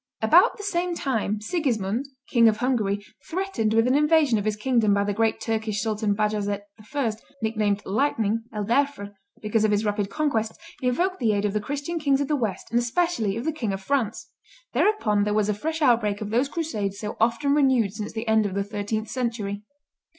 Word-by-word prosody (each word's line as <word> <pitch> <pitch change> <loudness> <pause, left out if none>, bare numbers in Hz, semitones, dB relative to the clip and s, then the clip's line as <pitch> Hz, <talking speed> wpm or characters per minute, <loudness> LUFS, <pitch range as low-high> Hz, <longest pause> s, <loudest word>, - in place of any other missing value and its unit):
About - - +5
the 415 - -8
same 355 -3 -1
time 220 -8 -1
Sigismund, 235 - -1 0.2
King 235 -2 +6
of 215 - -1
Hungary, 210 -5 0 0.2
threatened 335 - -1
with 225 0 +4
an 255 - +3
invasion 300 -5 +4
of 205 - -4
his 215 -1 0
kingdom 220 -2 +2
by 200 - +2
the 205 0 -1
great 225 +1 +1
Turkish 220 -2 -2
Sultan 215 -2 0
Bajazet 205 -1 -1 0.3
I., 265 -6 +1 0.3
nicknamed 210 -2 0
Lightning 225 -1 0
(El 210 -3 -3
Derfr), 240 -4 0 0.3
because 215 +1 +1
of 215 - +3
his 205 +1 +1
rapid 205 -1 -1
conquests, 230 -6 -1 0.2
invoked 350 +10 0
the 225 -4 +2
aid 205 0 0
of 205 - 0
the 210 - 0
Christian 290 +8 -3
kings 280 -3 +2
of 285 - -1
the 300 - +2
West, 220 -9 -3
and 235 - +3
especially 240 - 0
of 235 - -4
the 320 - 0
King 225 -10 -2
of 195 - -5
France. 255 -3 -1 0.4
Thereupon 215 - +2
there 210 0 0
was 210 -1 +2
a - - +2
fresh 315 +9 -3
outbreak 225 -6 +3
of 210 -1 -5
those 250 +5 +2
crusades 215 - -3
so 210 +1 -5
often 235 +5 +2
renewed 260 -8 +3
since 210 0 -5
the 225 +1 -5
end 220 -1 +3
of 190 - -6
the 200 - 0
thirteenth 210 +1 -3
century. 215 -4 -3
225 Hz, 200 wpm, -25 LUFS, 210-275 Hz, 0.4 s, King